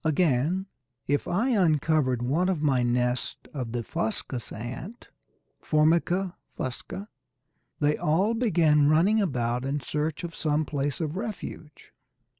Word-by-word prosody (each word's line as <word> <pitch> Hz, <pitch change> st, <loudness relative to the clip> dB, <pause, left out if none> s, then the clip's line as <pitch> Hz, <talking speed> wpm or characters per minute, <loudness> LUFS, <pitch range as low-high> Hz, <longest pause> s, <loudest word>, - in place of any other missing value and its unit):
Again, 160 Hz, +3 st, +2 dB, 0.4 s
if 145 Hz, +1 st, 0 dB
I 215 Hz, +9 st, +1 dB
uncovered 155 Hz, -, +2 dB
one 160 Hz, +9 st, +1 dB
of 185 Hz, -5 st, 0 dB
my 135 Hz, -4 st, +3 dB
nests 125 Hz, +1 st, 0 dB, 0.2 s
of 125 Hz, -6 st, -4 dB
the 120 Hz, 0 st, -2 dB
Fuscous 115 Hz, +3 st, -3 dB
ant 130 Hz, -, -7 dB, 0.5 s
(Formica 170 Hz, +4 st, +2 dB, 0.2 s
fusca), 130 Hz, +10 st, -5 dB, 0.7 s
they 150 Hz, 0 st, +2 dB
all 185 Hz, +9 st, +2 dB
began 160 Hz, -11 st, +3 dB
running 190 Hz, +8 st, +4 dB
about 125 Hz, -, 0 dB
in 140 Hz, +2 st, -1 dB
search 150 Hz, +5 st, -2 dB
of 170 Hz, -1 st, -5 dB
some 155 Hz, -1 st, 0 dB
place 145 Hz, +1 st, -2 dB
of 155 Hz, +2 st, -2 dB
refuge. 195 Hz, -8 st, -7 dB
150 Hz, 125 wpm, -27 LUFS, 130-180 Hz, 0.7 s, running